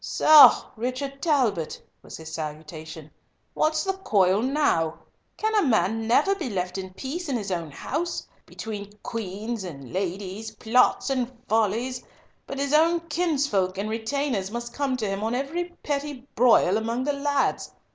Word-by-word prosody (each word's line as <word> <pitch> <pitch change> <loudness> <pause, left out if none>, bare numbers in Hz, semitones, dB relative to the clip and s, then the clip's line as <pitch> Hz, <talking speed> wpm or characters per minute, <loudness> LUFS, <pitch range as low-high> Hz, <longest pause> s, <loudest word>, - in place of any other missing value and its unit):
"Soh! 310 -1 +7
Richard 255 +4 -4
Talbot," 240 - +1 0.2
was - - -10
his 160 0 -9
salutation, 155 0 -7 0.4
"what's 310 0 +1
the 385 - 0
coil 200 - +2
now? 250 - +1 0.4
Can 435 0 0
a 425 - +4
man 225 - +1
never 295 +11 +4
be 345 -10 -4
left 185 -2 -3
in 190 -1 -7
peace 295 - -5
in 260 - 0
his 205 -3 -5
own 170 -3 -2
house, 325 - -4 0.2
between 205 -2 -7
queens 220 0 -4
and 140 -8 -9
ladies, 195 +3 -4
plots 250 +5 +2
and 255 -2 -1 0.2
follies, 225 +4 0 0.5
but 275 - -5
his 280 +1 -1
own 330 +2 +4
kinsfolk 285 - 0
and 210 +2 -2
retainers 225 -3 -1
must 235 +2 -5
come 275 -3 -1
to 220 -4 -2
him 195 +1 -3
on 225 +2 0
every 290 +7 -2 0.2
petty 285 -2 -3
broil 225 -5 +4
among 230 +3 -2
the 290 +1 0
lads! 280 0 0
230 Hz, 155 wpm, -25 LUFS, 195-280 Hz, 0.5 s, Soh